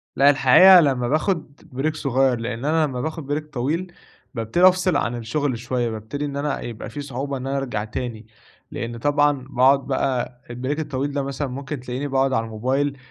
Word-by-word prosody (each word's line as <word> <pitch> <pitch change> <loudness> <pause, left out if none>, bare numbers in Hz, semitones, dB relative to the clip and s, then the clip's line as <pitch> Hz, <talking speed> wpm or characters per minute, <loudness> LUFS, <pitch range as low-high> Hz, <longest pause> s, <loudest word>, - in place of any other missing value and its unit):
لأ، 140 +2 +6
الحقيقة 145 +7 +8
لمّا 130 -5 +1
باخد 155 -1 -1 0.2
بريك 150 +5 -1
صغيّر، 135 -4 +1
لإن 120 +2 -4
أنا 155 0 +2
لمّا 125 -3 -4
باخد 160 -2 -5
بريك 150 +1 -2
طويل، 165 +8 -2 0.4
بابتدي 125 +11 +3
أفصِل 185 0 +2
عن 115 +2 -1
الشغل 120 +3 -2
شويّة، 120 0 -2
بابتدي 110 +7 -5
إن 140 -1 -4
أنا 145 0 -2
يبقى 110 -3 -7
في 145 +5 -6
صعوبة 140 0 -4
إن 130 +1 -6
أنا 140 +1 -1
أرجع 125 -6 -2
تاني، 110 -1 -6 0.4
لإن 115 0 -5
طبعًا 145 0 +1
باقعد 135 +2 +4
بقى 130 -2 -1
البريك 130 +5 -3
الطويل 145 -2 -2
ده 140 -1 -2
مثلًا، 140 +1 -3
ممكن 135 +2 -5
تلاقيني 125 +3 -4
باقعد 135 -1 +1
على 115 -3 +1
الموبايل، 135 +6 -1
135 Hz, 185 wpm, -22 LUFS, 125-145 Hz, 0.4 s, الحقيقة